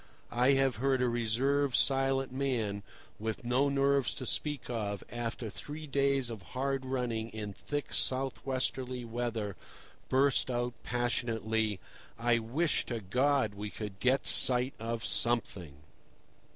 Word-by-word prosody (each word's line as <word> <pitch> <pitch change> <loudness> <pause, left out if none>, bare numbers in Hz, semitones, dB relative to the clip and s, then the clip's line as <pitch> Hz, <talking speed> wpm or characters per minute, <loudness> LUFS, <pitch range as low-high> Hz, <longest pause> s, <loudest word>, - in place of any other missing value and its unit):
I 125 +3 +4
have 135 -1 +2
heard 135 +2 +1
a 125 - +2
reserved, 125 +4 +1
silent 135 -1 +2
man, 120 -7 -1 0.4
with 110 +2 -4
no 130 +4 +2
nerves 140 -1 +2
to 130 - -4
speak 145 +3 0
of, 105 -5 -3
after 120 -1 -4
three 150 +9 -7
days 140 -3 +1
of 110 -3 -7 0.2
hard 135 0 -1
running 120 -4 -2
in 105 -2 -6
thick 145 +7 -4
south 130 0 +2
westerly 130 -1 -2
weather, 115 -4 -3 0.5
burst 135 0 +3
out 120 0 -1
passionately: 115 -4 -1 0.4
"I 120 0 +2
wish 140 +9 0
to 120 -2 -3
God 125 +3 +1
we 105 +1 -5
could 105 -2 -7
get 130 +2 +2
sight 125 +1 +6
of 115 +1 -3
something!" 100 - 0
125 Hz, 135 wpm, -31 LUFS, 115-135 Hz, 0.5 s, sight